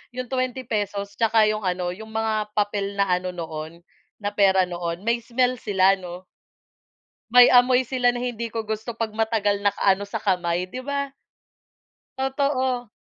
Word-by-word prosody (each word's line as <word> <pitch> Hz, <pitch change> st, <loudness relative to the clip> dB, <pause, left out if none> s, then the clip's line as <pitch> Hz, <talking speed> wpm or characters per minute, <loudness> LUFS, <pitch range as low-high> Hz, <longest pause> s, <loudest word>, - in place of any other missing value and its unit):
Yung 255 Hz, 0 st, -5 dB
₱20 220 Hz, -6 st, -3 dB
tsaka 225 Hz, -1 st, +4 dB
yung 215 Hz, -3 st, -3 dB
ano, 180 Hz, -1 st, -1 dB
yung 220 Hz, +4 st, -9 dB
mga 220 Hz, -1 st, 0 dB
papel 205 Hz, -1 st, -1 dB
na 200 Hz, -2 st, +1 dB
ano 180 Hz, 0 st, -1 dB
noon, 160 Hz, 0 st, -7 dB, 0.3 s
na 205 Hz, -1 st, -4 dB
pera 190 Hz, -2 st, +4 dB
noon, 175 Hz, 0 st, -4 dB
may 235 Hz, +1 st, +1 dB
smell 245 Hz, +1 st, 0 dB
sila, 195 Hz, -2 st, +3 dB
'no? 180 Hz, 0 st, -8 dB, 1.1 s
May 245 Hz, 0 st, +8 dB
amoy 250 Hz, +1 st, +5 dB
sila 250 Hz, 0 st, 0 dB
na 245 Hz, -, -3 dB
hindi 235 Hz, -2 st, -3 dB
ko 225 Hz, 0 st, -4 dB
gusto 220 Hz, +2 st, -5 dB
'pag 230 Hz, -1 st, -3 dB
matagal 215 Hz, -2 st, 0 dB
nakaano 200 Hz, 0 st, +1 dB
sa 215 Hz, -, -9 dB
kamay, 180 Hz, -3 st, 0 dB
di 185 Hz, +8 st, -7 dB
ba? 280 Hz, +1 st, -3 dB, 1.1 s
Totoo. 265 Hz, -3 st, -1 dB
215 Hz, 150 wpm, -24 LUFS, 190-245 Hz, 1.1 s, May